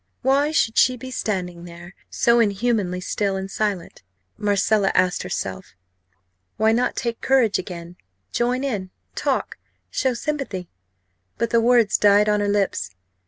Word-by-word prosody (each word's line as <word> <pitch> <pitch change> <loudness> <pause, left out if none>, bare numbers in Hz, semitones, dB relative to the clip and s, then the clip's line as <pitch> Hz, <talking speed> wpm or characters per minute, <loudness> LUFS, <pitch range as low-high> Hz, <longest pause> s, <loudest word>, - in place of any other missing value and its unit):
Why 275 +3 +3
should 225 -7 +2
she 255 0 +4
be 255 +2 -8
standing 180 -7 -3
there, 175 +1 -11 0.2
so 235 0 +3
inhumanly 205 -4 0
still 200 +1 -1
and 190 0 -5
silent? 200 -5 -3 0.3
Marcella 205 0 +2
asked 180 0 +2
herself. 95 - -5 0.8
Why 220 0 +3
not 240 +2 +1
take 235 -2 -3
courage 255 -6 +3
again 175 -1 -8 0.3
join 250 +2 0
in 205 -9 -3 0.2
talk - - -2 0.3
show 260 -2 0
sympathy? 255 - -4 0.7
But 235 - -1
the 230 - +4
words 235 -2 +3
died 205 0 +5
on 210 0 +2
her 205 - 0
lips. 200 - 0
210 Hz, 140 wpm, -22 LUFS, 185-240 Hz, 0.8 s, died